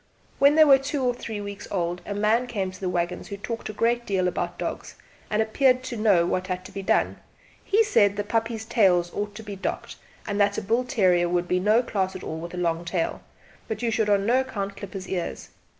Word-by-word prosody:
When 280 +2 +6
they 315 - +8
were 275 -2 +7
two 275 0 -2
or 250 -1 +2
three 220 -3 -6
weeks 200 -1 -7
old 175 -2 -2
a 205 - -3
man 220 +4 +2
came 195 -6 -2
to 185 - -13
the 185 - -2
waggons 175 0 -2
who 200 - -6
talked 230 +3 -5
a - - -2
great 235 +3 +1
deal 190 -4 0
about 180 - -3
dogs, - - -5 0.3
and 215 +1 +2
appeared 255 +3 +2
to 255 -2 -5
know 205 -6 +3
what 185 +1 -1
had 185 -1 -4
to - - -10
be 195 - -5
done. 190 - +1 0.5
He 430 +3 +3
said 215 - +3
that 205 - -2
the - - -19
puppies' 225 0 -1
tails 185 -7 +3
ought 205 0 -4
to 220 - -8
be 205 -2 -6
docked, 190 - -4 0.3
and 205 -1 -1
that 200 0 +2
a - - -1
bull 230 +5 +1
terrier 180 -7 +2
would 175 0 0
be 180 - +1
no 215 +6 +3
class 190 -5 -2
at 185 - -7
all 160 - -5
with 170 +2 -7
a - - -7
long 170 -1 0
tail, 170 -1 -2 0.5
but 220 +1 -4
you 230 - +1
should 220 -1 +1
on 200 -1 +3
no 245 +4 +4
account 200 -7 -4
clip 200 -3 -9
his 190 -1 -6
ears. 180 -3 -4
205 Hz, 245 wpm, -25 LUFS, 185-230 Hz, 0.5 s, they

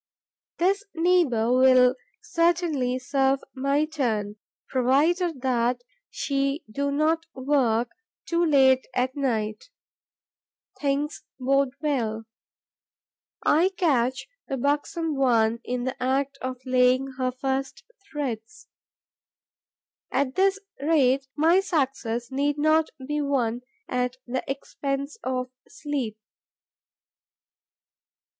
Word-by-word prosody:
This 390 +4 +2
neighbour 325 -10 +2
will 255 0 +6 0.3
certainly 335 -7 +1
serve 270 +1 +1
my 275 +3 +1
turn, 220 -9 -2 0.3
provided 290 +5 +1
that 245 -1 +1 0.3
she 275 +1 -1
do 280 +6 -2
not 315 +3 +1
work 250 -4 +1 0.4
too 340 0 +1
late 265 -5 +4
at 255 +1 0
night. 225 - -2 1.1
Things 285 +1 -1 0.2
bode 275 +1 +1
well: 230 -7 -1 1.2
I 335 +5 +4
catch 260 -6 +1 0.2
the 270 - -2
buxom 295 +4 -1
one 235 -4 +2
in 250 0 -3
the 260 0 -4
act 275 +2 0
of 255 0 -3
laying 255 +1 +3
her 255 -1 +1
first 265 +1 -3 0.3
threads. 285 - -5 1.4
At 270 -2 0
this 390 +3 +3 0.2
rate 275 -3 +2
my 330 +5 +4
success 270 - -1
need 285 +2 0
not 310 +1 +3 0.2
be 295 +2 -1
won 250 -5 0 0.3
at 250 0 -1
the 255 +1 -3
expense 275 +4 -4
of 255 -1 -2 0.2
sleep. 270 -8 -4
270 Hz, 100 wpm, -25 LUFS, 250-295 Hz, 1.4 s, will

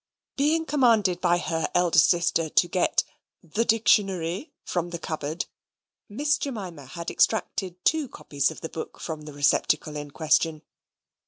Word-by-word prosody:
Being 310 +3 +2
commanded 225 - +3
by 175 -1 +3
her 165 -2 -2
elder 175 -1 +4
sister 170 -2 +3
to 175 - +3
get 180 +1 +1 0.4
"the 190 +7 -1
Dictionary" 200 - +1
from 175 -1 -2
the 170 - -4
cupboard, 155 0 -4 0.6
Miss 290 +8 0
Jemima 185 - -6
had 170 +5 -6
extracted 195 -4 0
two 310 -4 +2
copies 140 -1 -1
of - - -10
the 160 - -5
book 160 - -7
from 155 -2 -6
the 150 - -9
receptacle 145 +1 +1
in 145 0 -5
question. 155 +1 +1
175 Hz, 145 wpm, -26 LUFS, 155-215 Hz, 0.6 s, elder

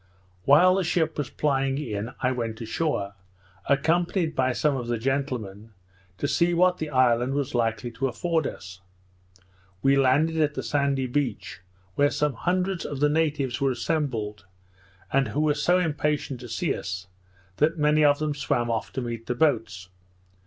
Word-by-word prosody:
While 175 +7 +6
the 190 0 +1
ship 160 -2 0
was 140 -3 -2
plying 135 -2 0
in, 110 -6 -4
I 125 - +3
went 115 -3 -3
ashore, 115 -3 -2 0.6
accompanied 165 +4 +1
by 130 0 +2
some 145 +3 +1
of 125 -3 -4
the 120 0 -1
gentlemen, 115 -5 -3 0.4
to 145 - -1
see 170 +4 +2
what 180 +1 +3
the 155 - -3
island 130 -1 +2
was 140 -2 -2
likely 120 0 -1
to 135 +3 -1
afford 160 +4 -1
us. 95 0 -9 1.0
We 135 0 +5
landed 145 +5 +3
at 150 0 +1
the - - -3
sandy 140 -2 0
beach, 125 - -3 0.3
where 145 +6 +3
some 150 -1 0
hundreds 180 +6 -1
of 145 - -5
the 150 +1 +3
natives 145 -5 0
were 135 - +3
assembled, 120 -8 -2 0.7
and 135 0 +3
who 150 - -1
were 155 -1 +3
so 175 +5 +2
impatient 150 -5 -1
to 120 -1 -9
see - - -1
us, 95 +1 -5 0.5
that 160 +3 +2
many 150 0 +3
of 145 -1 +5
them 155 0 -1
swam 120 -4 -1
off 115 - -2
to 130 - -2
meet 115 -2 -5
the 125 - -1
boats. 110 - 0
140 Hz, 165 wpm, -25 LUFS, 120-155 Hz, 1.0 s, While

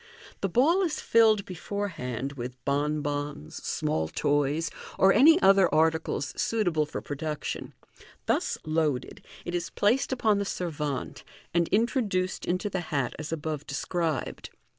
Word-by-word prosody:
The 195 - -1
ball 305 - +4
is 340 -5 -1
rilled 220 -3 +5
before 200 +3 -4
hand 130 - -4
with 125 -1 -6
bonbons, 145 - -2
small 80 0 -1
toys, 145 - 0 0.3
or 195 0 +6
any 315 - +7
other 195 -2 +6
articles 160 -2 +1
suitable 175 -9 +1
for 150 - -5
pro 145 - -5
duction. 150 0 -4 0.5
Thus - - 0
" - - -28
loaded," 145 -5 -2 0.2
it 175 - -4
is 175 -1 -2
placed 235 +8 +1
upon 220 -5 +2
the - - 0
servante, 150 -8 -4 0.3
and 170 -1 +2
intro 235 +6 +2
duced 185 -4 -2
into 185 +4 0
the 190 -2 -2
hat 140 -5 0
as 155 0 -5
above 155 -2 -4
described. 160 0 -2
165 Hz, 145 wpm, -28 LUFS, 145-200 Hz, 0.5 s, any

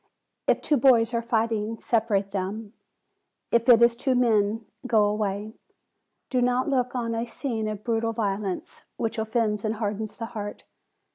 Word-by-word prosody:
If - - +3
two 295 - +2
boys 240 -2 +4
are 235 - +1
fighting, 225 -1 -1
separate 215 -5 0
them; 205 +3 -4 0.8
if 235 +1 +2
it 235 -1 +8
is 235 0 +5
two 260 +2 +1
men, 225 -2 +2 0.2
go 220 -4 +4
away: 205 0 -1 0.8
do 255 -2 +2
not 250 +1 +1
look 255 -3 0
on 230 -2 -1
a 230 +1 -2
scene 230 -3 -3
of 210 -1 -5
brutal 230 -1 0
violence, 200 -3 -3 0.2
which 225 0 -2
offends 220 -1 0
and 220 0 -1
hardens 215 0 -3
the 230 - -4
heart. 210 -2 -6
225 Hz, 155 wpm, -26 LUFS, 210-235 Hz, 0.8 s, it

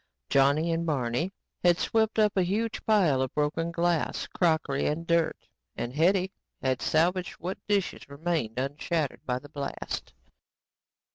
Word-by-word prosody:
Johnny 145 +5 +4
and 165 0 0
Barney 145 +2 0 0.3
had 175 -1 +5
swept 220 +2 +1
up 210 -2 +3
a 190 - +4
huge 215 +5 -1
pile 180 -12 +4
of 130 - -1
broken 155 +3 0
glass, 170 -1 0
crockery 160 -5 +1
and 160 +3 -1
dirt 170 -1 +1 0.3
and 120 +1 -4
Hetty 185 +5 +3 0.3
had 130 -1 0
salvaged 175 +2 +1
what 180 +3 -5
dishes 200 -8 -1
remained 140 -6 -2
unshattered 145 +3 -2
by 125 -1 +1
the 145 +3 -11
blast. 140 -1 -5
165 Hz, 140 wpm, -28 LUFS, 140-180 Hz, 0.3 s, had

